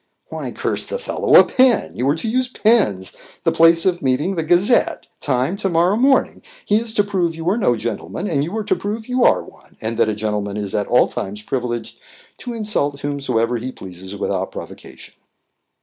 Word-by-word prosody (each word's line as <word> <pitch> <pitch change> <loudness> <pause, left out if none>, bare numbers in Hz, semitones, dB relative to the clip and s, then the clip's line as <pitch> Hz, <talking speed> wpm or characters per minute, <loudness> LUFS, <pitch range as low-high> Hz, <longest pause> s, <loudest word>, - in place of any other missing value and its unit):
"Why, - - -5
curse - - -1
the - - -3
fellow, 485 - 0
a - - +10
pen! 255 -2 +2
You 130 +3 0
are 145 - +2
to 165 - -4
use 255 +3 0
pens 210 - +1 0.3
the - - +2
place 165 0 +5
of 180 -2 +1
meeting, 135 +8 0
the 170 - -1
Gazette 180 +9 +2
time, 130 +5 0
to 200 -1 -1
morrow 175 +3 +2
morning. 265 +4 +2 0.2
He 210 - +3
is 225 0 -2
to 205 - +4
prove 185 -5 -1
you 165 +1 -6
are - - +1
no 125 - +2
gentleman, 115 - -4
and 145 -7 0
you 175 +8 -4
are 220 - -2
to - - +1
prove 215 +2 -5
you 250 0 +1
are - - +4
one, - - -19
and 115 +1 -4
that 115 -2 +3
a 105 - -1
gentleman 105 -1 -3
is 100 -2 -4
at 105 - -1
all 125 - +4
times 105 +1 -6
privileged 120 -1 -4 0.4
to 245 - -6
insult 175 -11 -1
whomsoever 125 -5 -1
he 125 +3 -5
pleases 95 -2 -9
without - - -2
provocation." - - -10
160 Hz, 200 wpm, -20 LUFS, -, 0.4 s, a